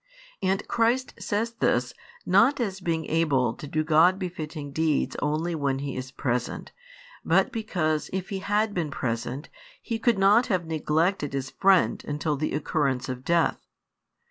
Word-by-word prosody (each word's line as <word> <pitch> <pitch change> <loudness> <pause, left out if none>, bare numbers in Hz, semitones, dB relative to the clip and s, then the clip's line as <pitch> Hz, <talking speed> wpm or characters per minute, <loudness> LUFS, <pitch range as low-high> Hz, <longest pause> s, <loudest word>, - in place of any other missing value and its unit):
And 190 +2 0
Christ 240 +3 +1
says 220 +3 -1
this, 125 - 0 0.3
not 230 +10 +4
as 195 -5 -2
being 165 -3 -1
able 140 -8 +1
to 145 - -9
do 155 +2 0
God 165 +4 +4
befitting 155 -6 -5
deeds 155 0 0
only 155 +4 0
when 140 -4 0
He 140 0 -4
was 130 0 -5
present; 125 -2 -3 0.5
but - - +3
because 175 - -1
if 190 +1 -3
He 195 -2 -3
had 205 +2 0
been 170 -5 -1
present, 125 +2 -3 0.3
He 230 -2 -4
could 235 -2 +2
not 205 +5 +5
have 185 -7 0
neglected 160 0 0
His 135 -1 -3
friend 190 -2 +3
until 150 +1 -1
the 155 +1 -2
occurrence 140 -4 -1
of 130 0 -5
death. 170 +1 +1
160 Hz, 155 wpm, -26 LUFS, 145-195 Hz, 0.5 s, not